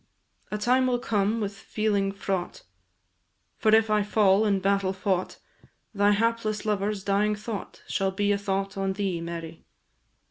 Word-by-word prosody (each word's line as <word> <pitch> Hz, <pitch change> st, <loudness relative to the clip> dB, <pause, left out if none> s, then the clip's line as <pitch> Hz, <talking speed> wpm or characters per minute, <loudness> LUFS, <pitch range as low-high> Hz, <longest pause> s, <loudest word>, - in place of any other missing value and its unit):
A 210 Hz, -, -2 dB
time 255 Hz, +4 st, +2 dB
will 250 Hz, -1 st, +2 dB
come 215 Hz, -1 st, 0 dB
with 205 Hz, -2 st, -2 dB
feeling 205 Hz, -1 st, -1 dB
fraught, 195 Hz, -, -4 dB, 1.0 s
For 220 Hz, -, +2 dB
if 220 Hz, -1 st, +3 dB
I 210 Hz, 0 st, +3 dB
fall 205 Hz, 0 st, +3 dB
in 200 Hz, -2 st, +2 dB
battle 195 Hz, 0 st, +1 dB
fought, 190 Hz, -1 st, -1 dB, 0.6 s
Thy 205 Hz, 0 st, +3 dB
hapless 220 Hz, 0 st, 0 dB
lover's 205 Hz, -1 st, -1 dB
dying 205 Hz, +2 st, +1 dB
thought 210 Hz, -1 st, -7 dB
Shall 195 Hz, 0 st, 0 dB
be 205 Hz, +2 st, 0 dB
a 200 Hz, -, +2 dB
thought 195 Hz, 0 st, -2 dB
on 195 Hz, 0 st, 0 dB
thee, 190 Hz, -4 st, -2 dB
Mary. 165 Hz, -1 st, -7 dB
200 Hz, 150 wpm, -26 LUFS, 195-215 Hz, 1.0 s, if